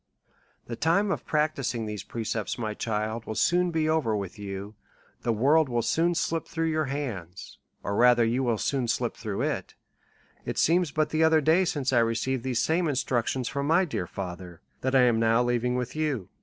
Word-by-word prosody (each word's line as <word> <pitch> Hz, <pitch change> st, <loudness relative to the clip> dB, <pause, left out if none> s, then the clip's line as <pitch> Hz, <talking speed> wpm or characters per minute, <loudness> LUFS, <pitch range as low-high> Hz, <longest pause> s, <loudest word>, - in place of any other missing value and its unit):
The 120 Hz, -, -5 dB
time 175 Hz, -, +2 dB
of -, -, -4 dB
practising 140 Hz, -7 st, 0 dB
these 105 Hz, -2 st, -5 dB
precepts, 110 Hz, 0 st, -4 dB
my 110 Hz, -3 st, -3 dB
child, 110 Hz, +1 st, -3 dB
will 110 Hz, -, -5 dB
soon 180 Hz, +7 st, +2 dB
be 160 Hz, -2 st, 0 dB
over 155 Hz, -9 st, +1 dB
with 100 Hz, +1 st, -5 dB
you, 100 Hz, +1 st, -6 dB, 0.5 s
the 120 Hz, -, 0 dB
world 140 Hz, +7 st, +3 dB
will 120 Hz, -1 st, 0 dB
soon 165 Hz, +9 st, +1 dB
slip 165 Hz, -1 st, -1 dB
through 165 Hz, -1 st, -1 dB
your 155 Hz, 0 st, 0 dB
hands, 110 Hz, -, -6 dB, 0.2 s
or 100 Hz, -, -2 dB
rather 120 Hz, 0 st, +5 dB
you 120 Hz, +3 st, 0 dB
will 120 Hz, -4 st, +1 dB
soon 130 Hz, +2 st, -1 dB
slip -, -, -1 dB
through -, -, -4 dB
it; -, -, -3 dB, 0.7 s
it -, -, -4 dB
seems 175 Hz, 0 st, +3 dB
but 155 Hz, +1 st, 0 dB
the 155 Hz, +1 st, +2 dB
other 160 Hz, 0 st, +5 dB
day 160 Hz, +5 st, +3 dB
since 140 Hz, -6 st, -1 dB
1 120 Hz, -2 st, +4 dB
receiv 115 Hz, +4 st, 0 dB
ed -, -, -9 dB
these 125 Hz, -1 st, -1 dB
same 165 Hz, +5 st, +1 dB
instructions 130 Hz, -2 st, -1 dB
from 140 Hz, 0 st, -2 dB
my 170 Hz, +4 st, +4 dB
dear 120 Hz, -, -3 dB
fatlier, 90 Hz, -2 st, -7 dB, 0.2 s
that 130 Hz, +1 st, 0 dB
I 130 Hz, -, +6 dB
am 120 Hz, -2 st, +3 dB
now 115 Hz, +1 st, +3 dB
leaving 120 Hz, 0 st, 0 dB
with 125 Hz, +1 st, -3 dB
you. 150 Hz, -11 st, -2 dB
125 Hz, 195 wpm, -27 LUFS, 115-155 Hz, 0.7 s, I